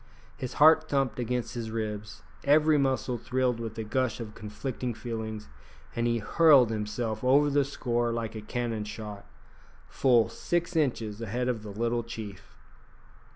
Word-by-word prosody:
His 130 Hz, -2 st, -5 dB
heart 155 Hz, +1 st, +6 dB
thumped 135 Hz, -3 st, 0 dB
against 125 Hz, 0 st, -2 dB
his 115 Hz, -2 st, -4 dB
ribs, 105 Hz, -2 st, -5 dB, 0.2 s
every 150 Hz, +1 st, +4 dB
muscle 130 Hz, -3 st, 0 dB
thrilled 125 Hz, 0 st, 0 dB
with 115 Hz, -1 st, -6 dB
a 110 Hz, -, -2 dB
gush 115 Hz, 0 st, -1 dB
of 110 Hz, -2 st, -6 dB
conflicting 120 Hz, +3 st, -5 dB
feelings, 110 Hz, -2 st, -5 dB, 0.5 s
and 120 Hz, 0 st, +1 dB
he 120 Hz, 0 st, +1 dB
hurled 130 Hz, +2 st, +5 dB
himself 110 Hz, +1 st, -3 dB
over 140 Hz, +3 st, +4 dB
the 145 Hz, 0 st, +3 dB
score 120 Hz, -4 st, -1 dB
like 115 Hz, -1 st, -3 dB
a 110 Hz, -, -6 dB
cannon 115 Hz, 0 st, -3 dB
shot, 105 Hz, -1 st, -8 dB, 0.6 s
full 120 Hz, -4 st, +3 dB
six 175 Hz, 0 st, -2 dB
inches 115 Hz, -8 st, 0 dB
ahead 120 Hz, +3 st, -2 dB
of 120 Hz, -3 st, -1 dB
the 105 Hz, -, -8 dB
little 115 Hz, +3 st, -1 dB
chief! 110 Hz, -4 st, -9 dB
120 Hz, 155 wpm, -28 LUFS, 110-130 Hz, 0.6 s, heart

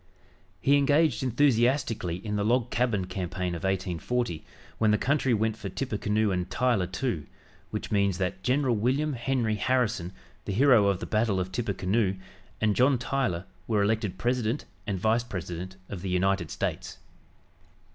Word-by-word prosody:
He 140 Hz, +1 st, +4 dB
engaged 145 Hz, 0 st, +3 dB
enthusiastically 120 Hz, -, +2 dB
in 105 Hz, -1 st, -2 dB
the 105 Hz, -, 0 dB
"Log 120 Hz, +2 st, +1 dB
Cabin" 115 Hz, -6 st, +1 dB
campaign 90 Hz, -1 st, -3 dB
of 85 Hz, -, -6 dB
1840, 95 Hz, +1 st, -1 dB, 0.4 s
when 110 Hz, -, +3 dB
the 105 Hz, -, +4 dB
country 135 Hz, +1 st, +1 dB
went 110 Hz, -1 st, +1 dB
for -, -, -6 dB
"Tippecanoe 105 Hz, -4 st, 0 dB
and 90 Hz, 0 st, -2 dB
Tyler, 120 Hz, -4 st, +1 dB
too," 95 Hz, -, -3 dB, 0.4 s
which -, -, -5 dB
means 100 Hz, -3 st, +2 dB
that 95 Hz, 0 st, -2 dB
General 130 Hz, +2 st, +2 dB
William 135 Hz, +8 st, +1 dB
Henry 120 Hz, -3 st, 0 dB
Harrison, 110 Hz, -8 st, 0 dB, 0.3 s
the 100 Hz, -, -2 dB
hero 120 Hz, -2 st, +5 dB
of 100 Hz, -2 st, +1 dB
the -, -, -3 dB
battle 110 Hz, -3 st, +1 dB
of 95 Hz, 0 st, -3 dB
Tippecanoe, 100 Hz, -1 st, 0 dB, 0.4 s
and 105 Hz, -2 st, +2 dB
John 130 Hz, +1 st, +4 dB
Tyler 115 Hz, -8 st, -1 dB, 0.2 s
were 105 Hz, -3 st, +2 dB
elected 105 Hz, -2 st, 0 dB
President 120 Hz, +4 st, 0 dB, 0.2 s
and 100 Hz, -2 st, -1 dB
Vice 110 Hz, +4 st, +2 dB
President 90 Hz, -3 st, -6 dB
of 95 Hz, -4 st, -6 dB
the 95 Hz, -, -4 dB
United 95 Hz, +2 st, +1 dB
States. -, -, -3 dB
110 Hz, 155 wpm, -28 LUFS, 95-125 Hz, 0.4 s, hero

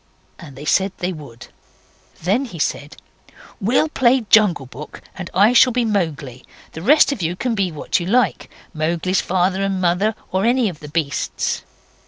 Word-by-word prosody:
And 150 Hz, -6 st, -12 dB
they 145 Hz, +3 st, -9 dB
said 190 Hz, +4 st, +1 dB
they 180 Hz, +1 st, -3 dB
would. 140 Hz, -8 st, -12 dB, 0.7 s
Then 210 Hz, +10 st, +1 dB
he 220 Hz, -9 st, -9 dB
said, 145 Hz, -1 st, -3 dB, 0.6 s
'We'll 245 Hz, +10 st, +1 dB
play 260 Hz, -3 st, +3 dB
Jungle 200 Hz, -10 st, +4 dB
Book, 135 Hz, +4 st, -11 dB
and 180 Hz, -3 st, -7 dB
I 205 Hz, +5 st, +4 dB
shall 250 Hz, +1 st, +6 dB
be 245 Hz, 0 st, 0 dB
Mowgli. 155 Hz, -, -2 dB, 0.3 s
The 160 Hz, -, -8 dB
rest 285 Hz, -, +5 dB
of 265 Hz, -8 st, -4 dB
you 170 Hz, +1 st, -1 dB
can 245 Hz, +5 st, -2 dB
be 195 Hz, -4 st, -1 dB
what 155 Hz, -, -1 dB
you 175 Hz, -, -5 dB
like 245 Hz, +5 st, +1 dB, 0.2 s
Mowgli's 170 Hz, +4 st, 0 dB
father 185 Hz, +1 st, 0 dB
and 195 Hz, -1 st, -1 dB
mother, 185 Hz, +4 st, +1 dB, 0.2 s
or 190 Hz, +1 st, 0 dB
any 240 Hz, -1 st, +2 dB
of 160 Hz, -5 st, -10 dB
the 150 Hz, -, -10 dB
beasts. 150 Hz, -2 st, -2 dB
185 Hz, 175 wpm, -20 LUFS, 160-220 Hz, 0.7 s, shall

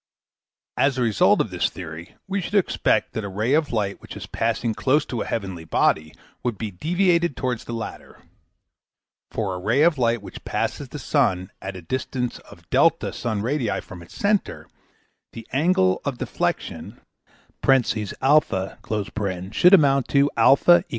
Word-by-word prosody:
As 135 Hz, -1 st, +2 dB
a 125 Hz, -, +1 dB
result 110 Hz, -6 st, +4 dB
of -, -, -3 dB
this -, -, 0 dB
theory, 85 Hz, 0 st, -9 dB
we 195 Hz, 0 st, -1 dB
should 205 Hz, -, -5 dB
expect 200 Hz, -, +1 dB
that 110 Hz, -, -3 dB
a 100 Hz, -, -4 dB
ray 110 Hz, +7 st, 0 dB
of 155 Hz, 0 st, +2 dB
light 105 Hz, -4 st, -2 dB
which -, -, -10 dB
is -, -, -7 dB
passing 115 Hz, -1 st, -1 dB
close 135 Hz, +7 st, +1 dB
to 120 Hz, -, -4 dB
a -, -, -4 dB
heavenly 95 Hz, -6 st, -4 dB
body 80 Hz, -1 st, +1 dB, 0.3 s
would 120 Hz, -4 st, -2 dB
be 110 Hz, -1 st, -4 dB
deviated 170 Hz, -, +1 dB
towards 125 Hz, -3 st, -2 dB
the 120 Hz, -, -6 dB
latter. 115 Hz, -1 st, -7 dB, 1.1 s
For 100 Hz, -4 st, -2 dB
a 90 Hz, -, -5 dB
ray 115 Hz, +10 st, +2 dB
of 160 Hz, -4 st, +3 dB
light 115 Hz, -3 st, +1 dB
which -, -, -10 dB
passes -, -, -3 dB
the -, -, -7 dB
sun 90 Hz, 0 st, 0 dB
at 95 Hz, 0 st, -6 dB
a 90 Hz, -, -9 dB
distance 125 Hz, +5 st, -3 dB
of -, -, -17 dB
D -, -, +3 dB
sun 110 Hz, -3 st, -3 dB
radii 125 Hz, -3 st, -1 dB
from 90 Hz, -, -11 dB
its 85 Hz, -, -14 dB
centre, 205 Hz, 0 st, 0 dB, 0.7 s
the 115 Hz, -, -9 dB
angle 135 Hz, -, +2 dB
of 140 Hz, -4 st, -3 dB
deflection -, -, -3 dB, 0.7 s
(a) 135 Hz, -2 st, +6 dB, 1.7 s
should 180 Hz, -, +5 dB
amount 140 Hz, -6 st, +3 dB
to 140 Hz, +1 st, +3 dB
eq. 175 Hz, +6 st, +6 dB
120 Hz, 160 wpm, -23 LUFS, 100-145 Hz, 1.7 s, a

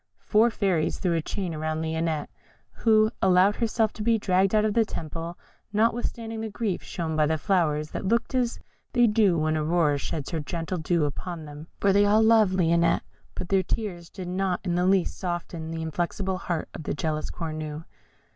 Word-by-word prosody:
Four 220 Hz, +2 st, +4 dB
fairies 190 Hz, -8 st, 0 dB
threw 180 Hz, -3 st, 0 dB
a 165 Hz, -, +1 dB
chain 180 Hz, +1 st, -4 dB
about 155 Hz, 0 st, -2 dB
Lionette, 160 Hz, -1 st, -2 dB, 0.4 s
who 215 Hz, -1 st, +3 dB
allowed 190 Hz, +2 st, +4 dB
herself 225 Hz, -2 st, +1 dB
to -, -, -8 dB
be 230 Hz, +1 st, +3 dB
dragged 195 Hz, 0 st, +2 dB
out 215 Hz, 0 st, +4 dB
of 215 Hz, -, +1 dB
the 230 Hz, -, +4 dB
temple 165 Hz, -3 st, -6 dB, 0.4 s
notwithstanding 225 Hz, 0 st, 0 dB
the 220 Hz, -, -3 dB
grief 210 Hz, -3 st, -2 dB
shown 160 Hz, -2 st, -4 dB
by 155 Hz, -1 st, +3 dB
the 160 Hz, +1 st, +1 dB
flowers, 155 Hz, -4 st, +1 dB
that -, -, -4 dB
looked 235 Hz, +5 st, +1 dB
as 245 Hz, -2 st, 0 dB, 0.3 s
they 245 Hz, -1 st, +5 dB
do 210 Hz, -5 st, +3 dB
when 155 Hz, 0 st, +1 dB
Aurora 155 Hz, -2 st, +2 dB
sheds 145 Hz, 0 st, -4 dB
her 165 Hz, -, -1 dB
gentle 165 Hz, +4 st, -3 dB
dew 160 Hz, 0 st, +1 dB
upon 160 Hz, +3 st, -5 dB
them, 150 Hz, +1 st, -10 dB
for 200 Hz, -1 st, +3 dB
they 205 Hz, +1 st, +5 dB
all 210 Hz, +2 st, +4 dB
loved 220 Hz, -4 st, +5 dB
Lionette; 170 Hz, -1 st, +3 dB, 0.3 s
but 175 Hz, -, -5 dB
their 195 Hz, -1 st, +3 dB
tears 180 Hz, -3 st, -4 dB
did 185 Hz, -2 st, -7 dB
not 185 Hz, 0 st, -1 dB
in 180 Hz, -, -1 dB
the 180 Hz, +1 st, +2 dB
least 190 Hz, -2 st, +2 dB
soften 175 Hz, -3 st, -4 dB
the 165 Hz, 0 st, -4 dB
inflexible 180 Hz, +4 st, -2 dB
heart 170 Hz, -4 st, -3 dB
of -, -, -7 dB
the 145 Hz, -, -3 dB
jealous 155 Hz, 0 st, -2 dB
Cornue. 155 Hz, -1 st, -5 dB
180 Hz, 190 wpm, -26 LUFS, 160-210 Hz, 0.4 s, they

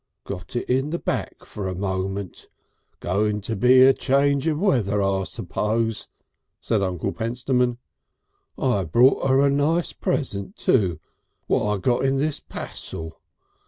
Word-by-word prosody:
"Got 90 Hz, -1 st, -7 dB
it 120 Hz, -, -2 dB
in 135 Hz, +3 st, +1 dB
the 170 Hz, -, -2 dB
back -, -, -3 dB
for 100 Hz, -2 st, -5 dB
a 90 Hz, -, -3 dB
moment. 95 Hz, 0 st, -4 dB, 0.5 s
Going 105 Hz, +3 st, 0 dB
to 110 Hz, +3 st, -3 dB
be 125 Hz, +5 st, +6 dB
a 135 Hz, +1 st, +7 dB
change 140 Hz, +2 st, +1 dB
of 155 Hz, -2 st, 0 dB
weather 120 Hz, -, +1 dB
I 95 Hz, -1 st, 0 dB
suppose," 110 Hz, +3 st, -2 dB, 0.5 s
said 110 Hz, -3 st, 0 dB
Uncle 90 Hz, -3 st, -2 dB
Pentstemon. 125 Hz, +1 st, 0 dB, 0.8 s
"I 120 Hz, -7 st, +1 dB
brought 120 Hz, -, +3 dB
'er 135 Hz, +2 st, +4 dB
a 140 Hz, -, +3 dB
nice 155 Hz, +5 st, +1 dB
present, 100 Hz, -9 st, -2 dB
too, 95 Hz, -10 st, +1 dB, 0.5 s
what -, -, +1 dB
I 105 Hz, 0 st, +1 dB
got 120 Hz, +7 st, +1 dB
in 135 Hz, 0 st, +2 dB
this 145 Hz, +1 st, 0 dB
passel. 80 Hz, 0 st, -7 dB
115 Hz, 145 wpm, -23 LUFS, 100-135 Hz, 0.8 s, a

